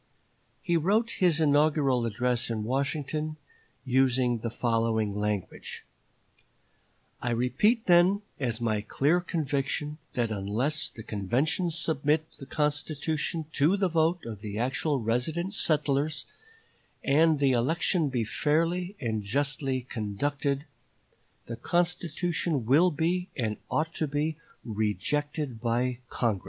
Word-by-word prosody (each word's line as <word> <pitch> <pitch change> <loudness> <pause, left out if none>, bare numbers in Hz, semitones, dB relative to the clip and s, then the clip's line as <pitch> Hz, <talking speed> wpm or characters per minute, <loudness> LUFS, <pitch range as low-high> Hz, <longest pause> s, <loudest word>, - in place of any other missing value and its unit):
He 175 -3 +2
wrote 210 +8 +2
his 175 -4 +4
inaugural 145 -5 +3
address 120 +2 0
in 110 -2 -2
Washington, 145 +5 -2 0.5
using 125 -2 +2
the 115 - -3
following 115 -2 0
language: 105 -2 -3 1.4
"I 120 - -1
repeat 125 - +2
then 180 +3 +5 0.2
as 120 -4 -1
my 110 -3 0
clear 145 +10 +2
conviction 150 -2 -2
that 120 -3 0
unless 110 +10 -1
the 110 - -11
convention 125 - 0
submit 155 -1 0
the 135 - -9
constitution 150 +2 -1
to 160 +8 +3
the 190 -2 +1
vote 165 +1 +1
of 110 -3 -7
the 105 -1 -5
actual 135 +4 0
resident 140 - -1
settlers, 150 -3 +1 0.8
and 155 +3 +4
the 140 -1 +3
election 155 +6 +2
be 125 -3 0
fairly 165 - 0
and 110 -5 -1
justly 135 +4 -1
conducted, 140 +5 -2 0.8
the 115 - -6
constitution 170 -2 0
will 150 +10 +5
be 175 +4 -1
and 110 -5 -1
ought 160 +1 0
to 155 - -1
be 150 +2 -1 0.3
rejected 125 +4 -1
by 120 +1 0
Congress." 110 -5 0
140 Hz, 120 wpm, -28 LUFS, 120-160 Hz, 1.4 s, then